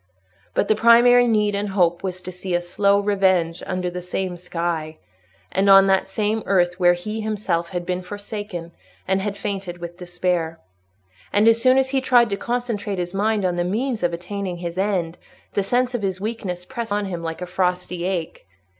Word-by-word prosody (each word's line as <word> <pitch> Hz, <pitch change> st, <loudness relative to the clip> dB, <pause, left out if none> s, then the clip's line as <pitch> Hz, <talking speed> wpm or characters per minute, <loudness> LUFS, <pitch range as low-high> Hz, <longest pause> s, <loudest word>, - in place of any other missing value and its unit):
But -, -, +2 dB
the -, -, +4 dB
primary 240 Hz, +2 st, +6 dB
need 210 Hz, -2 st, +2 dB
and 200 Hz, +1 st, -1 dB
hope 175 Hz, -3 st, +2 dB
was 185 Hz, -1 st, -4 dB
to 185 Hz, -, -6 dB
see 180 Hz, 0 st, -3 dB
a -, -, +3 dB
slow 200 Hz, +3 st, +2 dB
revenge 190 Hz, -4 st, +1 dB
under 185 Hz, -1 st, -2 dB
the 180 Hz, 0 st, -4 dB
same 180 Hz, 0 st, -3 dB
sky 170 Hz, -2 st, -3 dB, 0.5 s
and 195 Hz, +1 st, +2 dB
on 195 Hz, 0 st, +8 dB
the 190 Hz, -1 st, +3 dB
same 215 Hz, +2 st, -1 dB
earth 180 Hz, -2 st, +2 dB
where 175 Hz, -1 st, +5 dB
he 215 Hz, +5 st, -5 dB
himself 205 Hz, -6 st, -1 dB
had 175 Hz, -2 st, -4 dB
been 180 Hz, 0 st, -2 dB
forsaken 205 Hz, -3 st, -6 dB, 0.4 s
and 190 Hz, +1 st, +1 dB
had 200 Hz, 0 st, -3 dB
fainted 195 Hz, -4 st, -4 dB
with 175 Hz, 0 st, -8 dB
despair. 175 Hz, -2 st, -2 dB, 0.7 s
And 210 Hz, +2 st, +3 dB
as 230 Hz, 0 st, +5 dB
soon 255 Hz, +1 st, +5 dB
as 265 Hz, 0 st, +2 dB
he 270 Hz, -1 st, +1 dB
tried 240 Hz, -4 st, +4 dB
to -, -, +1 dB
concentrate 220 Hz, -3 st, -3 dB
his 175 Hz, 0 st, -3 dB
mind 205 Hz, 0 st, +1 dB
on 175 Hz, -1 st, 0 dB
the 175 Hz, -, +1 dB
means 225 Hz, +6 st, -1 dB
of 175 Hz, -1 st, +1 dB
attaining 180 Hz, +1 st, -4 dB
his 170 Hz, -1 st, -5 dB
end, 185 Hz, -4 st, -1 dB, 0.3 s
the -, -, +1 dB
sense 245 Hz, +5 st, +1 dB
of 245 Hz, -, -2 dB
his 190 Hz, -2 st, -2 dB
weakness 195 Hz, -4 st, -4 dB
pressed 235 Hz, -1 st, -5 dB
upon 205 Hz, 0 st, 0 dB
him 175 Hz, -3 st, -4 dB
like 165 Hz, +1 st, -5 dB
a -, -, -3 dB
frosty 180 Hz, -1 st, -1 dB
ache. 175 Hz, -, -3 dB
190 Hz, 195 wpm, -22 LUFS, 175-210 Hz, 0.7 s, on